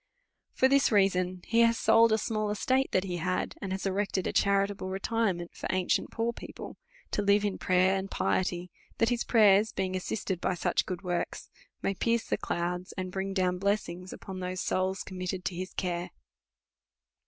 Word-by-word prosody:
i^'or 260 - +5
this 275 0 +4
reason 185 -3 +2
he 230 - +2
has 230 0 +5
sold 225 +1 +5
a 220 - +4
small 215 -1 -1
estate 260 +6 +1
that 185 - +2
he 180 -2 -3
had, 185 +2 -1
and 195 - -4
has 190 +1 -3
erected 195 -1 0
a - - -1
cha 200 - +3 0.2
ritable 200 -2 -6
retirement 195 -3 -1
for - - -5
ancient, 185 -1 +1
poor 230 +1 -1
people, - - -9 0.4
to - - 0
live 200 +1 +3
in 200 - -2
prayer 185 +1 +3
and 195 0 -3
piety 180 -2 -1
— - - -31
that 230 - +3
his 240 -1 0
prayers, 215 -1 +5
being 185 0 -2
assisted 185 -1 -3
by 185 - 0
such - - 0
good 180 -2 -4
vvorkpi, 175 -2 -3 0.4
may 195 - +1
pierce 230 +4 +1
the - - +1
clouds, 180 +2 -3
and 185 -1 -3
bring 195 +1 -3
down 185 -2 0
blessings 185 -2 -1
upon 190 -2 -8
those 185 0 -3
souls 190 +1 -1
committed 185 0 -5
to - - -1
his 185 +2 -5
care. 175 -2 -3
190 Hz, 190 wpm, -29 LUFS, 185-210 Hz, 0.4 s, i^'or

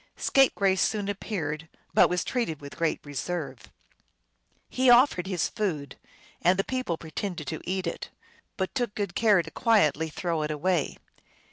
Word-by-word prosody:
Scapegrace 200 -8 +3
soon 210 -2 0
appeared, 165 -6 -4 0.2
but - - +6
was 180 0 0
treated 230 - -2
with 140 -1 -10
great 165 -2 0
reserve. 145 -1 -5 1.0
He 255 0 +2
offered 240 -7 +5
his 185 -3 0
food, 170 -10 -3 0.5
and 180 +2 +4
the 195 - +2
people 255 -10 -2
pretended 165 0 -5
to 160 - -5
eat 185 +1 -2
it, 170 - -4 0.5
but 190 -1 -2
took 240 -5 -2
good 200 -4 -2
care 205 -5 +4
to 165 - -10
quietly 160 -8 +2
throw 165 +1 -2
it 150 - -2
away. 155 +1 0
180 Hz, 150 wpm, -27 LUFS, 160-205 Hz, 1.0 s, but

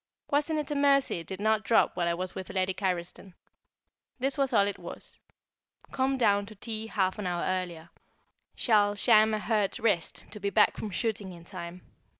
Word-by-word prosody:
Wasn't 295 +2 +1
it 300 -1 -3
a - - +1
mercy 280 -7 +3
it 165 - -10
did 190 -1 -6
not 215 +1 +2
drop 225 +3 +3
while 175 -1 0
I 170 - +1
was 185 +1 -4
with 190 - -7
Lady 190 0 0
Carriston? 180 -1 -4 0.8
This 270 +1 -1
was 275 -2 +1
all 205 -4 +4
it 200 - -3
was: - - -8 0.7
"Come 270 0 0
down 205 -4 +2
to 215 - -11
tea 220 +1 -5
half 190 -2 0
an 200 - -2
hour 175 -1 -1
earlier; 175 -3 -3 0.6
shall 205 -3 +3
sham 215 +1 +5
a 215 - 0
hurt 210 -2 0
wrist 205 -7 0
to 210 - -5
be 200 0 -1
back 210 +1 +4
from 215 - -5
shooting 205 -1 -2
in 170 -1 -13
time. 175 -1 -8
205 Hz, 190 wpm, -29 LUFS, 185-225 Hz, 0.8 s, sham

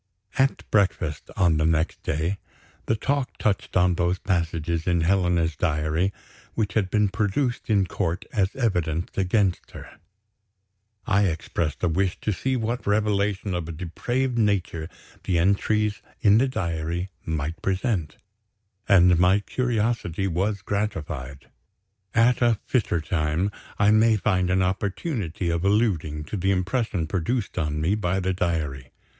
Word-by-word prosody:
At 135 +1 +1
breakfast, 90 -7 +1
on 85 -4 +3
the 80 - +1
next 80 0 0
day, 85 +6 -1 0.5
the 110 - +2
talk 140 +3 -1
touched 100 -3 0
on 90 0 +4
those 90 +1 +1
passages 85 -3 -1
in 85 -2 +2
Helena's 85 -2 +2
diary, 75 +5 0 0.4
which 110 -3 -1
had 100 -4 +1
been 105 +1 +3
produced 110 +6 -1
in 100 -3 +3
court 90 -1 -2
as 100 -1 +1
evidence 90 - -1
against 95 -1 +1
her. - - -11 1.1
I 100 0 +3
expressed 80 -1 -3
a - - +4
wish 90 +3 0
to 110 - 0
see 130 +7 -1
what 120 -1 -2
revelation 105 -1 +1
of 85 -2 -3
a - - -3
depraved 120 +10 -2
nature 90 -6 0 0.4
the 90 -3 +1
entries 100 +4 +1 0.2
in 105 +1 +5
the 135 - +3
diary 85 -5 -3
might 80 0 -3
present; 95 - -1 0.7
and 90 -2 +6
my 95 +3 +4
curiosity 115 -6 -1
was 95 +3 -1
gratified. 80 -10 -4 0.7
At 115 +2 +4
a 120 -3 +4
fitter 105 -9 0
time, 80 +4 0 0.3
I 100 0 +4
may 110 +1 +5
find 95 -4 +1
an 95 +1 +3
opportunity 95 - -2
of 85 +1 -1
alluding 95 -8 +1
to 90 +8 -5
the 95 +1 0
impression 95 -1 0
produced 95 +5 -2
on 75 -1 -1
me 80 +6 +1
by 95 -3 0
the 95 0 0
diary. 75 -8 -2
95 Hz, 140 wpm, -25 LUFS, 85-105 Hz, 1.1 s, and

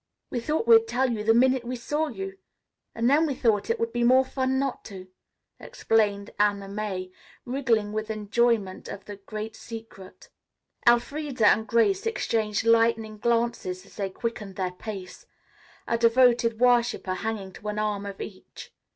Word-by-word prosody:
"We 245 - -1
thought 300 +3 -1
we'd 225 -1 +7
tell 250 +2 +1
you 215 -2 -3
the 225 - +4
minute 255 +1 +3
we 245 +1 -4
saw 295 +6 -1
you, 195 -6 -7 0.6
and 230 +1 +1
then 300 +5 +4
we 280 - -2
thought 220 -4 +1
it 230 - 0
would 230 0 -2
be 240 0 0
more 260 +2 +5
fun 260 0 -1
not 270 -1 -2
to," 190 -3 -9 0.5
explained 205 -2 0
Anna 205 -1 +1
May 195 -2 -4 0.3
wriggling 235 -5 0
with 215 0 -3
enjoyment 215 -2 0
of 200 - -8
the 205 -1 -8
great 215 +2 -7
secret. 225 -5 -11 0.6
Elfreda 250 +1 +2
and 220 +2 +4
Grace 380 - +2
exchanged 220 - -1
lightning 225 -2 +2
glances 230 -6 -1
as - - -18
they 200 -2 -2
quickened 210 -1 -5
their 185 -1 -2
pace, 185 0 -8 0.6
a 230 - 0
devoted 235 -1 +4
worshipper 245 -5 +2
hanging 195 -1 -4
to 210 - -10
an 210 0 -3
arm 210 -1 -2
of 200 -1 -8
each. 185 -3 -10
225 Hz, 160 wpm, -26 LUFS, 205-240 Hz, 0.6 s, we'd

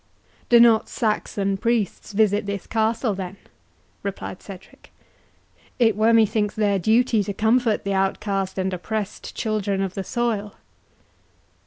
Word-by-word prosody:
"Do 240 - +7
not 230 -2 +5
Saxon 200 -3 -1
priests 225 -2 -1
visit 205 0 +2
this 200 -2 -4
castle, 225 0 0
then?" 190 0 -6 0.6
replied 200 -2 -6
Cedric; 195 -2 -13 0.9
"it 225 -4 +3
were, 220 +2 +3
methinks, 215 -2 +2
their 205 -2 +1
duty 225 +3 +3
to 200 - -4
comfort 225 +1 +2
the 200 - -1
outcast 195 0 -1
and 190 0 -1
oppressed 210 +3 -5
children 210 -3 -1
of 195 -2 -2
the 195 - -4
soil." 220 -3 -2
210 Hz, 130 wpm, -23 LUFS, 195-225 Hz, 0.9 s, Do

